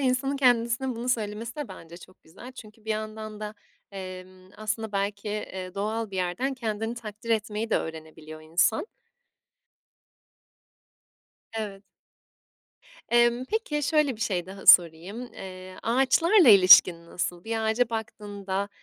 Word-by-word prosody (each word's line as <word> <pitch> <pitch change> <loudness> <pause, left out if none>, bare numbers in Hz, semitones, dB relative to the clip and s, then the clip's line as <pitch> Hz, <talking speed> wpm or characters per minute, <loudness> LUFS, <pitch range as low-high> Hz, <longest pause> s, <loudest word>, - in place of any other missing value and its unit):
insanın 270 +1 0
kendisine 245 -1 +2
bunu 240 0 -4
söylemesi 225 0 -2
de, 295 -3 -5
bence, 170 -3 -11
çok 185 +1 -17
güzel. 215 +10 -13
Çünkü 215 -3 -14
bir 220 - -5
yandan 215 0 -5
da, 210 0 -6 0.4
emm, 185 -1 -10
aslında, 215 +1 -4
belki, 200 +1 -2
eee, 190 -3 -5
doğal 215 +2 -3
bir 190 - -6
yerden 185 +10 -1
kendini 225 -2 -3
takdir 225 -1 -8
etmeyi 220 0 -1
de - - +3
öğrenebiliyor 155 -1 -9
insan. 165 - +1 2.7
Evet. 210 -3 -5 1.3
Emm, 240 +1 +3
peki, 300 -7 -2
şöyle 295 -3 +2
bir 215 - -12
şey 180 -6 -1
daha 195 +1 -11
sorayım. 180 +8 +4
Eee, 185 0 -10
ağaçlarla 270 - +4
ilişkin 185 -3 +8
nasıl? 175 0 -4
Bir 225 0 -3
ağaca 225 +2 +1
baktığında, 205 -3 -4
215 Hz, 125 wpm, -26 LUFS, 185-235 Hz, 2.7 s, ilişkin